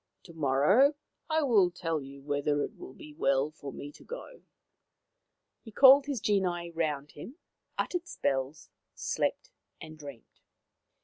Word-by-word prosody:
" - - -51
To 170 - -12
morrow 160 - +3 0.3
I 315 0 +2
will 210 -9 +4
tell 165 -3 -3
you 135 0 -11
whether 145 0 0
it - - -6
will 130 - -11
be 150 - -12
well 140 0 +1
for 145 -3 -9
me 145 +2 -8
to - - -17
go." - - -9 1.2
He 225 - -12
called 275 +4 +7
his 280 -4 -2
genii 180 -5 0
round 150 -3 -2
him, 235 - -10 0.4
uttered 355 -1 -2
spells, 135 +2 -3 0.2
slept, - - -2 0.3
and 155 -1 -11
dreamed. 140 -6 -12
160 Hz, 145 wpm, -30 LUFS, 145-220 Hz, 1.2 s, called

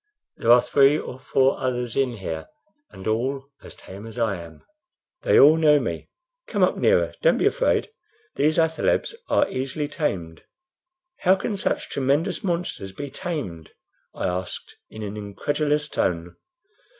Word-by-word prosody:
There 115 - +3
are 120 0 +7
three 140 +1 +4
or 130 -4 -7
four 135 0 +2
others 125 -2 -2
in 135 -3 +1
here, 80 -5 -5 0.4
and 95 - -12
all 135 +5 -1
as - - -12
tame 100 +4 -10
as 115 - -11
I 110 -5 0
am. 80 -1 -13 0.6
They - - +4
all 150 +3 +8
know 150 -2 +5
me. - - -4 0.4
Come - - +1
up - - +3
nearer; - - +2
don't - - +4
be - - +1
afraid. - - +1 0.4
These 155 +2 +1
athalebs 160 - +1 0.2
are 290 - +3
easily 135 +3 -3
tamed." 90 - -3 0.8
"How 185 +2 +4
can 205 +2 -3
such 195 - -2
tremendous 140 - 0
monsters 170 - -3
be 140 +5 -6
tamed?" 135 - -5 0.4
I - - -3
asked, 90 0 -4
in 110 - -8
an 105 +1 -5
incredulous 145 +8 -1
tone. 85 - -2
135 Hz, 150 wpm, -24 LUFS, 100-150 Hz, 0.8 s, all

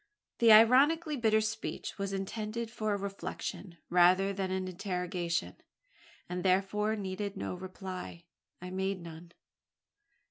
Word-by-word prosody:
The 230 -1 +7
ironically 280 +9 +6
bitter 220 -4 +3
speech 220 -1 -4
was 200 0 -2
intended 215 +4 -4
for 215 -2 -2
a 205 - +1
reflection, 195 -2 -6
rather 180 +3 +4
than 190 -1 -2
an 185 0 -2
interrogation, 180 -2 -3 0.7
and 180 0 -4
therefore 200 +3 +1
needed 200 0 -4
no - - -3
reply. 185 -1 -7 0.4
I 180 +1 -7
made 190 +1 -2
none. 170 0 -10
195 Hz, 120 wpm, -31 LUFS, 180-215 Hz, 0.7 s, The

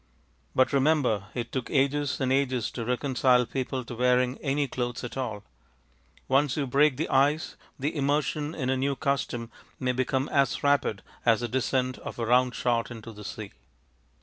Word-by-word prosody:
But 130 +1 +3
remember 135 -8 +2
it 120 -2 -3
took 130 -3 -3
ages 140 0 +1
and 130 -1 +1
ages 130 -4 0
to 115 - -4
reconcile 125 0 +2
people 130 +1 -3
to - - -7
wearing 125 +1 +2
any 140 0 0
clothes 120 -2 -3
at 120 -1 -6
all. 115 -6 -3 0.8
Once 135 +1 +2
you 145 - 0
break 140 +1 +3
the 160 - -1
ice 145 +4 +2 0.2
the 145 +4 -2
immersion 145 +2 0
in 130 -3 -1
a 130 - +1
new 140 +1 0
custom 130 -4 -2 0.3
may 125 -1 +1
become 130 +2 0
as 140 -3 +1
rapid 140 -8 +2 0.2
as 115 -1 +3
the 120 - -1
descent 130 +1 0
of - - -7
a 115 - -1
round 125 +2 +3
shot 120 -2 0
into 115 -1 -9
the 105 0 -10
sea. - - -7
130 Hz, 175 wpm, -27 LUFS, 120-140 Hz, 0.8 s, But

